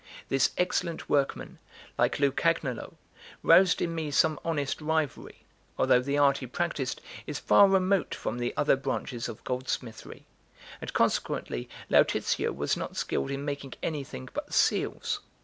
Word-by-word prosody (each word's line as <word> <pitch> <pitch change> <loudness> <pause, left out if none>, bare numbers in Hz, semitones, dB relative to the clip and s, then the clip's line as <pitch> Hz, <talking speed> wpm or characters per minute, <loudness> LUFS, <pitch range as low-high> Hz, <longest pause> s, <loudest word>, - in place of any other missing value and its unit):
This 135 -1 +3
excellent 180 -2 -1
workman, 140 -2 0 0.4
like - - +1
Lucagnolo, 140 -2 0 0.5
roused 180 +2 +5
in 170 - -2
me 160 -2 -3
some 155 +2 +2
honest 150 -3 -2
rivalry, 155 -2 -2 0.3
although 125 - +4
the 140 +3 -1
art 140 -1 +4
he 130 - -6
practised 140 -1 -2 0.3
is 150 - -3
far 200 - +6
remote 190 0 +2
from 120 - -4
the 120 - -1
other 145 - +4
branches 130 -2 -3
of 110 - -9
gold 125 0 -3
smithery, 115 -3 -5 0.6
and - - -5
consequently - - -1 0.2
Lautizio - - +2
was 70 +2 -1
not - - -6
skilled 70 - -1
in 140 +1 -3
making 140 -2 -5
anything 140 - -4
but - - -5
seals. - - +1
140 Hz, 145 wpm, -28 LUFS, 130-165 Hz, 0.6 s, far